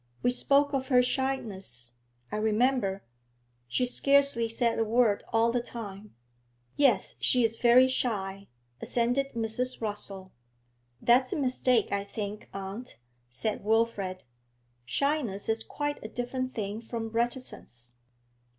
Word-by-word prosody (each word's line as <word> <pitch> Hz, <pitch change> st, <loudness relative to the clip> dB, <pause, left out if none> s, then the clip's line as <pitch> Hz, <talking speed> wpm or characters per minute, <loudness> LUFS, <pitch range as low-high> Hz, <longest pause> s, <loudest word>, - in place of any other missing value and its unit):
We 245 Hz, -, +4 dB
spoke 285 Hz, +3 st, +3 dB
of 265 Hz, -1 st, -1 dB
her 250 Hz, -2 st, +5 dB
shyness, 205 Hz, -, -3 dB, 0.4 s
I -, -, -2 dB
remember; 215 Hz, -2 st, +1 dB, 0.6 s
she 250 Hz, -, +1 dB
scarcely 275 Hz, -2 st, +3 dB
said 230 Hz, 0 st, +1 dB
a -, -, +3 dB
word 225 Hz, -2 st, +2 dB
all 230 Hz, +1 st, +3 dB
the 245 Hz, 0 st, 0 dB
time.' 210 Hz, -4 st, -8 dB, 0.6 s
'Yes, 275 Hz, -4 st, +3 dB
she 250 Hz, -1 st, +3 dB
is 225 Hz, 0 st, +1 dB
very 250 Hz, +1 st, +6 dB
shy,' 200 Hz, -6 st, -2 dB, 0.3 s
assented 250 Hz, +3 st, 0 dB
Mrs. 235 Hz, +3 st, -1 dB
Rossall. 205 Hz, -3 st, -5 dB, 0.7 s
'That's 255 Hz, +2 st, +4 dB
a -, -, -1 dB
mistake, 255 Hz, -4 st, +1 dB
I 200 Hz, 0 st, 0 dB
think, 205 Hz, 0 st, -6 dB
aunt,' 195 Hz, +6 st, -7 dB, 0.3 s
said 205 Hz, -, -3 dB
Wilfrid; 210 Hz, -4 st, 0 dB, 0.6 s
'shyness 260 Hz, -, -1 dB
is 225 Hz, 0 st, 0 dB
quite 290 Hz, +3 st, -4 dB
a -, -, -4 dB
different 255 Hz, +2 st, -3 dB
thing 210 Hz, 0 st, -3 dB
from 225 Hz, -1 st, -5 dB
reticence.' 230 Hz, -, -4 dB
230 Hz, 125 wpm, -29 LUFS, 205-255 Hz, 0.7 s, very